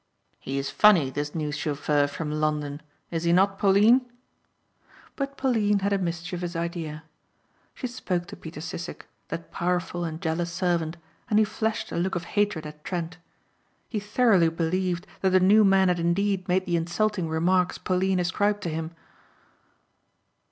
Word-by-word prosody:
"He 135 +1 -4
is 135 0 -2
funny, 180 -11 +5
this 145 +3 -4
new 150 -2 -2
chauffeur 145 -1 0
from 150 +1 -5
London 150 -1 -1 0.3
is 165 -1 -1
he 170 0 +2
not 195 +2 +3
Pauline?" 215 +6 +5 1.1
But 275 0 -4
Pauline 220 -6 +2
had 200 +1 +1
a 200 - +1
mischievous 175 0 -4
idea. 165 -2 -4 0.7
She - - -5
spoke 190 -8 -2
to 200 +3 -9
Peter 160 -2 -9
Sissek, 170 +1 -6 0.2
that 165 0 -6
powerful 175 0 -1
and 160 -1 -4
jealous 170 +1 -2
servant, 170 -2 -1 0.3
and 210 - +3
he 215 - +5
flashed 220 +1 -2
a - - -3
look 185 +3 0
of 170 - -2
hatred 205 -6 +1
at 150 0 -10
Trent. 175 -1 -4 0.7
He 215 - -2
thoroughly 205 -4 +3
believed 180 +2 -1
that 190 - +2
the 185 0 +5
new 205 +4 +6
man 195 -1 +5
had 180 -1 +1
indeed 185 +3 0
made 185 +1 +1
the 175 -1 +1
insulting 175 +2 -1
remarks 180 +3 +1
Pauline 185 0 0
ascribed 205 +3 0
to 170 - -2
him. 160 +1 -4
175 Hz, 160 wpm, -26 LUFS, 165-200 Hz, 1.1 s, new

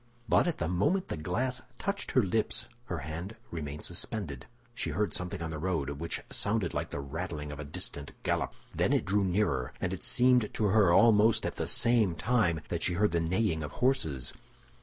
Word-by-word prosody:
But - - +4
at 170 - -1
the 85 - -1
moment 125 - +1
the - - -2
glass 105 +11 -2 0.2
touched 200 0 -3
her 130 - +5
lips, 105 +3 0 0.2
her - - -3
hand 85 +7 -5 0.2
remained 75 -3 -5
suspended; 85 - -2 0.3
she - - -2
heard 105 -1 0
something 90 -2 -2
on 80 - -4
the 80 - -4
road 80 -5 -1
which 80 +4 -4
sounded 100 -4 +1
like - - -2
the - - -4
rattling 75 +1 -5
of 75 - -7
a - - -4
distant 70 0 -3
gallop. - - 0 0.2
Then - - +2
it - - +2
grew 100 +2 +2
nearer, 90 -9 0
and 95 0 -1
it 95 - -6
seemed 125 -3 +4
to 110 - +1
her, 100 -3 +5
almost 110 +3 +5
at - - -3
the - - -2
same 115 -7 +3
time, 100 -6 +1
that 85 - -2
she 90 - +2
heard 105 +3 +2
the 85 - +1
neighing 85 0 0
of 75 - -5
horses. 80 - 0
90 Hz, 200 wpm, -30 LUFS, 80-110 Hz, 0.3 s, her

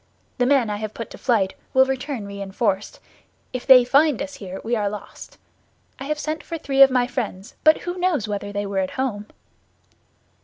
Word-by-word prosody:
The 245 - +3
men 260 -6 +3
I 205 - -2
have 215 0 -6
put 230 - -7
to - - -9
flight 210 -7 +1 0.2
will 260 0 +7
return 265 -3 -3
reinforced; 200 +1 -3 0.5
if 255 - -5
they 255 -2 +8
find 280 +1 +3
us 285 0 -5
here, 190 -1 -8
we 235 +2 0
are 205 -2 0
lost. 210 +1 -10 0.6
I 270 - -6
have 300 +1 -2
sent 310 +1 -3
for 335 - -5
three 275 -3 0
of 270 - +10
my 250 -1 +2
friends, 235 -5 -5
but 310 0 +5
who 355 +1 -5
knows 345 - 0
whether 205 -1 -4
they 205 0 -3
were 195 -1 -2
at 185 -1 -1
home?" 215 -6 -2
245 Hz, 195 wpm, -22 LUFS, 205-275 Hz, 0.6 s, of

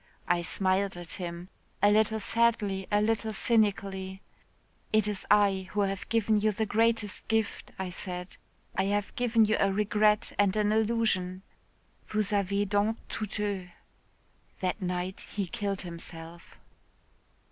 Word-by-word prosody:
I 175 0 +2
smiled 190 +2 +1
at 175 -1 -2
him, 175 +1 -6 0.3
a 205 - +5
little 220 +1 +3
sadly, 210 -4 +1
a 205 0 +3
little 220 0 0
cynically. 195 -4 0 0.7
'It 215 -1 +3
is 205 -2 -3
I 195 -3 +3
who 205 - +1
have 195 -1 -2
given 220 -2 +2
you 215 +1 +2
the 220 +2 -1
greatest 225 -1 +1
gift,' 220 -1 -1
I 190 -1 -4
said. 180 0 -5 0.4
'I 190 - +1
have 205 0 -1
given 230 -2 +3
you 215 +1 +1
a 195 - +3
regret 210 +1 +2
and 200 -1 +3
an 210 -1 +2
illusion. 215 -4 +1 0.6
Vous 215 -1 0
avez 200 0 +1
donc 205 +3 +1
tout 215 0 -4
eu.' 200 -3 -2 0.9
That 185 +3 -2
night 180 +1 -2
he 200 -2 0
killed 200 0 -3
himself." 170 -1 -9
205 Hz, 140 wpm, -29 LUFS, 190-215 Hz, 0.9 s, a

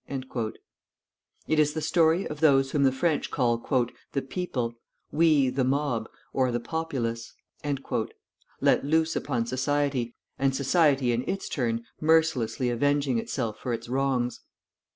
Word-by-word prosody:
_" 130 -5 -3 1.0
It 155 - +2
is 150 -1 +3
the - - 0
story 165 +3 +3
of 150 - -6
those 135 -3 +4
whom 145 - +1
the 135 -1 +5
French 145 +3 0
call 120 -3 +1 0.5
"the 135 - 0
people," 130 -6 -3 0.4
we 150 -5 +4
"the 130 +1 0
mob," 130 -4 0 0.2
or 130 -2 +2
"the 120 - 0
populace," 120 -5 -3 1.3
let - - +4
loose 160 +3 +2
upon 120 -5 -1
society, 130 -1 0 0.2
and 135 -1 +2
society 140 -2 +3
in 120 +1 0
its 195 +1 -2
turn 115 -3 -1 0.2
mercilessly 155 -6 +2
avenging 140 0 +1
itself 115 -2 -3
for 125 - -3
its 115 0 -5
wrongs. 130 -1 0
135 Hz, 135 wpm, -27 LUFS, 120-150 Hz, 1.3 s, the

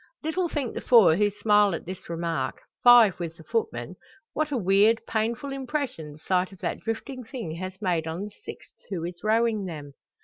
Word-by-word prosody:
Little 340 +3 -1
think 280 -7 -3
the - - -5
four 220 -10 +6
who 205 +3 +3
smile 205 -2 +3
at - - -7
this 185 0 -8
remark 165 -5 -2 0.2
five 235 -7 +7
with 165 -1 -5
the 160 - -13
footman 180 - -3 0.4
what 310 0 -1
a 275 - 0
weird, 205 +2 +4
painful 230 +5 -2
impression 265 - -4
the - - -14
sight 185 +3 0
of 190 - -13
that - - -2
drifting 250 +3 -5
thing 225 - -6
has 185 +1 -6
made 170 -4 0
on 165 +4 -4
the 210 - -7
sixth - - -10 0.2
who 180 -5 -3
is 175 0 -8
rowing 220 -1 +2
them. 150 -5 -7
205 Hz, 195 wpm, -26 LUFS, 170-235 Hz, 0.4 s, five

